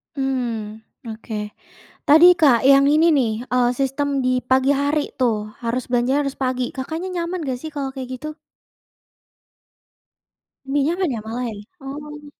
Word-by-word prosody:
Mmm, 240 -6 -3 0.3
oke. 215 -1 -6 0.6
Tadi 315 +4 +7
Kak 265 -7 +4
yang 275 +1 +6
ini 315 +3 +4
nih, 260 -7 +2 0.2
eee, 250 -1 +3
sistem 275 +1 -1
di 255 0 +1
pagi 260 +2 +2
hari 285 +2 0
tuh 215 -4 0
harus 235 +1 -2
belanja 255 +4 +2
harus 275 -1 -4
pagi. 255 -1 -1
Kakaknya 320 +8 -5
nyaman 345 0 -3
gak 250 -1 -3
sih 315 - -7
kalau 275 -2 -3
kayak 260 -1 -6
gitu? 305 +2 -7 2.3
Lebih 280 +1 0 0.2
nyaman 370 -5 0
ya - - -4
malah 240 +3 -4
ya, 220 - -7 0.3
oh. 295 +2 -8
270 Hz, 145 wpm, -21 LUFS, 245-290 Hz, 2.3 s, Tadi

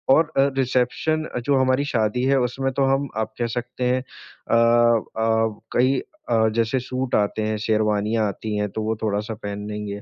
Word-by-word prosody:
और 160 -1 +2
अ, 135 +1 +4
रिसेप्शन 130 +5 +1
अ, - - 0
जो 140 +4 +1
हमारी 130 +2 +2
शादी 110 +2 +1
है 135 - +3
उसमें 135 +2 -2
तो 135 - +1
हम 140 0 -3
आप 110 0 -2
कह 120 - +1
सकते 120 +1 -4
हैं 125 +1 +1
अ 130 -2 -6
अ, 115 -1 +2 0.2
कई 130 +2 +3 0.3
अ, 110 -1 +3
जैसे 115 +3 +1
सूट 130 0 -2
आते 105 +1 +1
हैं, 110 0 -1
शेरवानियाँ 105 0 +1
आती 105 +2 -4
हैं 105 0 -1
तो 110 - -4
वो 110 +1 -1
थोड़ा-सा 105 +1 -1
पहन 105 0 -5
लेंगे। 105 -1 -5
115 Hz, 185 wpm, -23 LUFS, 110-130 Hz, 0.3 s, अ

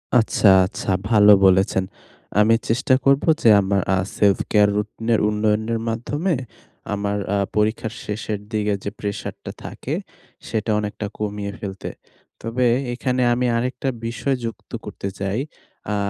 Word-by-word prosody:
আচ্ছা, 110 -2 +3 0.2
আচ্ছা। 100 - -6 0.2
ভালো 105 -2 +7
বলেছেন। 95 0 +3 0.6
আমি 110 +2 +5
চেষ্টা 130 +4 +2
করবো 140 +4 +3
যে 115 - +5
আমার 100 0 +1
আ - - +1 0.2
self-care 105 +1 +3
রুটিনের 110 +2 0
উন্নয়নের 110 +2 0
মাধ্যমে 145 +10 -1 0.6
আমার 100 0 -1 0.2
আ - - +2 0.2
পরীক্ষার 110 +1 0
শেষের 105 0 -3
দিকে 105 -2 0
যে - - -2
প্রেশারটা 100 -1 -5
থাকে - - -5 0.5
সেটা 110 0 -1
অনেকটা 105 0 -4
কমিয়ে 105 -1 -3
ফেলতে। 95 -2 -6 0.5
তবে 115 +3 -1 0.3
এখানে 125 +1 -1
আমি 125 +1 0
আরেকটা 125 +3 -2 0.2
বিষয় 125 +4 -1
যুক্ত 115 - -7
করতে - - -6
চাই। 100 +3 -1 0.5
আ - - 0
105 Hz, 130 wpm, -22 LUFS, 105-115 Hz, 0.6 s, ভালো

